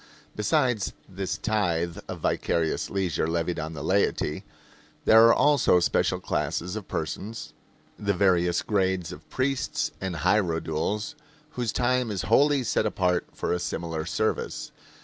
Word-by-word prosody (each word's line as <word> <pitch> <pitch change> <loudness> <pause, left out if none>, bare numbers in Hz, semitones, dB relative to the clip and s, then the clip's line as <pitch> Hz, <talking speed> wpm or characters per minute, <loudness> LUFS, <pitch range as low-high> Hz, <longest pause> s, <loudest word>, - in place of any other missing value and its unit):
Besides 125 -6 +1
this 95 0 -4
tithe 85 -6 -1
of - - -6
vicarious 80 -2 0
leisure 95 -5 -1
levied 85 +1 -1
on 80 +1 -4
the 70 - -6
laity, 100 +2 0 0.6
there 110 +1 +8
are 115 - +7
also 145 -11 +4
special 85 - +1
classes 90 +3 -2
of 110 -3 -6
persons 100 +8 -5 0.5
the 100 -1 0
various 90 -2 +2
grades 95 -4 0
of 75 +1 -11
priests 135 +1 -1
and 95 -2 -3
hierodules 85 - 0 0.4
whose 120 -5 -2
time 125 -1 +1
is 100 -3 -2
wholly 140 +4 +4
set 115 - +1
apart 90 -1 0
for - - -1
a 90 - -1
similar 80 -2 -3
service. - - -2
95 Hz, 135 wpm, -26 LUFS, 85-110 Hz, 0.6 s, there